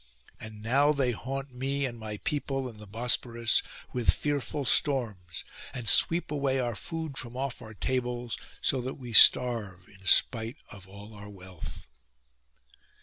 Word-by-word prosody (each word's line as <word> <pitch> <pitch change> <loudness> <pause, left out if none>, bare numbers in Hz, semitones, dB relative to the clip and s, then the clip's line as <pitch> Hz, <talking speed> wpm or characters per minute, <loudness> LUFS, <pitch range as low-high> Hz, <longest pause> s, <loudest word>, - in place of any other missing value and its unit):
And 110 -1 -9
now 140 +6 +4
they 135 -4 +1
haunt 135 +3 -5
me, 135 +2 -1
and 120 -3 -5
my 110 -1 -5
people, 135 0 -2
and 115 -4 -11
the 105 - -11
Bosphorus, 115 +1 0 0.3
with 125 -2 0
fearful 145 -1 0
storms; 110 - +1 0.3
and 120 -3 -5
sweep 165 +9 +4
away 140 -2 0
our 120 -2 -1
food 160 0 -5
from 120 0 -6
off 135 -1 -3
our 110 -1 -10
tables, 120 0 -2 0.3
so 130 - +2
that 130 +2 -4
we 125 -4 -9
starve 110 -7 +5
in 100 -1 -18
spite 115 +5 +4
of 100 -2 -11
all 100 +3 -12
our 105 0 -10
wealth. 95 -3 -10
120 Hz, 150 wpm, -29 LUFS, 110-135 Hz, 0.3 s, starve